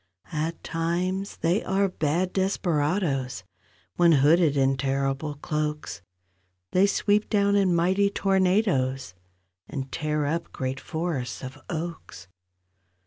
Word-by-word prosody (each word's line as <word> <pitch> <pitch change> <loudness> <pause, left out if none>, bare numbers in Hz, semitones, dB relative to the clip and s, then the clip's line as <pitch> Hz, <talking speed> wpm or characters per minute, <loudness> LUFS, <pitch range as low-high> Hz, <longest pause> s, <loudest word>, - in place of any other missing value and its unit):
At 160 +2 -3
times 180 +4 -2
they 175 +5 +1
are 195 +1 +1
bad 175 +1 -1
desperadoes— 155 - 0 0.5
When 170 -1 +6
hooded 150 +1 +4
in 135 0 +3
terrible 135 +2 -1
cloaks— 150 -7 -3 0.7
They 190 +2 +4
sweep 205 +1 +1
down 200 -1 +3
in 190 -3 +3
mighty 190 +4 +3
tornadoes 185 - +1 0.6
And 135 -2 -5
tear 150 -1 -1
up 165 +3 -2
great 130 0 -3
forests 160 -6 -4
of 130 +3 -8
oaks. 160 - -6
160 Hz, 110 wpm, -26 LUFS, 135-185 Hz, 0.7 s, When